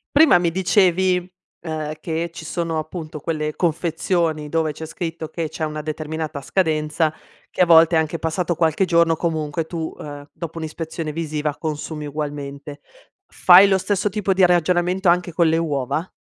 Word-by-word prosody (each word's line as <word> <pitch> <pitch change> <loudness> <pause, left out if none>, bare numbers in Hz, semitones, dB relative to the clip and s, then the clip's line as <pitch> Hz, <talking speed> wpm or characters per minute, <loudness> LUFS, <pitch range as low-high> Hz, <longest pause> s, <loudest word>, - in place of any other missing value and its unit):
Prima 300 - +7
mi 175 -1 0
dicevi, 185 -1 +2 0.3
ehm, 155 -2 -4
che 165 +1 -3
ci 160 -1 -10
sono 165 -1 -2
appunto 155 0 -6
quelle 155 0 -3
confezioni 165 -2 0
dove 160 0 0
c'è 160 +2 -8
scritto 165 -1 -5
che 165 -3 -4
c'è 160 - -6
una 155 0 -4
determinata 155 0 -4
scadenza, 155 0 0 0.4
che - - -2
a - - +7
volte 165 0 +6
anche 160 0 0
passato 170 +2 -1
qualche 165 +3 +1
giorno 170 -1 +3
comunque 160 -1 -2
tu, 160 -1 -4
ehm, 145 -1 -9
dopo 165 -1 -7
un'ispezione 160 0 -5
visiva 150 -2 -3
consumi 150 -1 -4
ugualmente. 145 -1 -6 0.4
Fai 185 +2 +7
lo 190 -1 +3
stesso 200 +2 0
tipo 200 -1 0
di 185 -1 +5
ragionamento 180 +1 +2
anche 175 -1 +1
con 170 -1 +3
le 160 +1 +2
uova? 155 +1 -1
160 Hz, 160 wpm, -21 LUFS, 155-175 Hz, 0.4 s, Prima